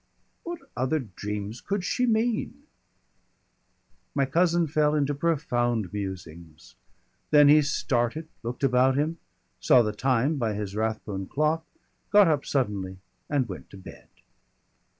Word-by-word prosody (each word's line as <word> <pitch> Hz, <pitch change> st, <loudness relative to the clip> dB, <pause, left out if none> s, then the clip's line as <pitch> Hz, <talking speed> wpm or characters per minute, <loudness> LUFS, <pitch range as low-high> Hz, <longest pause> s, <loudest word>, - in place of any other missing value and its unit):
"What 345 Hz, 0 st, -6 dB
other 130 Hz, +5 st, 0 dB
dreams 105 Hz, -, -5 dB
could 200 Hz, -2 st, -2 dB
she 250 Hz, +6 st, 0 dB
mean?" 235 Hz, +4 st, 0 dB, 1.5 s
My 140 Hz, -, +2 dB
cousin 170 Hz, +4 st, +2 dB
fell 150 Hz, 0 st, +1 dB
into 145 Hz, -1 st, +1 dB
profound 120 Hz, -, 0 dB
musings. 85 Hz, -4 st, -7 dB, 0.6 s
Then 145 Hz, -1 st, +7 dB
he 150 Hz, +1 st, +7 dB
started, 140 Hz, +1 st, -1 dB
looked 120 Hz, +3 st, -6 dB
about 130 Hz, 0 st, +4 dB
him, 160 Hz, +3 st, -1 dB, 0.4 s
saw 125 Hz, -, +5 dB
the 105 Hz, -1 st, -2 dB
time 130 Hz, +6 st, +1 dB
by 115 Hz, -5 st, -1 dB
his 100 Hz, -1 st, -5 dB
Rathbone 110 Hz, -3 st, -3 dB
clock, 155 Hz, +2 st, 0 dB, 0.4 s
got 205 Hz, -2 st, +6 dB
up 150 Hz, -3 st, +1 dB
suddenly 100 Hz, -8 st, -1 dB, 0.3 s
and 140 Hz, -4 st, +1 dB
went 95 Hz, -, -9 dB
to 100 Hz, -, -12 dB
bed. 95 Hz, -, -13 dB
130 Hz, 130 wpm, -26 LUFS, 105-155 Hz, 1.5 s, Then